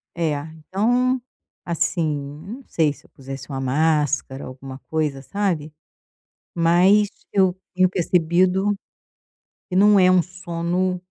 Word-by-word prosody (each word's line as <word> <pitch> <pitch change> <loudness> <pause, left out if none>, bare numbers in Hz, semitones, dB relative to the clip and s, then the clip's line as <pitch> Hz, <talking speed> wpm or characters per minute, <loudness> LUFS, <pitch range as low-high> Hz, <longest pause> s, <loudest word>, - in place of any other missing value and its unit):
É, 165 -2 0 0.4
então 245 +6 +2 0.4
assim, 170 -2 0 0.3
eu - - -13
não 275 - -15
sei 155 -3 +2
se - - -18
eu - - -34
pusesse 135 -1 -9
uma 135 -2 -4
máscara, 145 -1 0
alguma 130 +1 -9
coisa, 150 -4 -1
sabe? 165 -3 -2 0.8
Mas 180 +5 +4 0.2
eu 190 -2 +4 0.2
tenho 185 0 +3
percebido 180 +3 +2 1.0
que 185 - -3
não 205 +1 +6
é 185 0 +6
um 185 -1 +5
sono 180 +1 -2
175 Hz, 125 wpm, -22 LUFS, 150-185 Hz, 1.0 s, não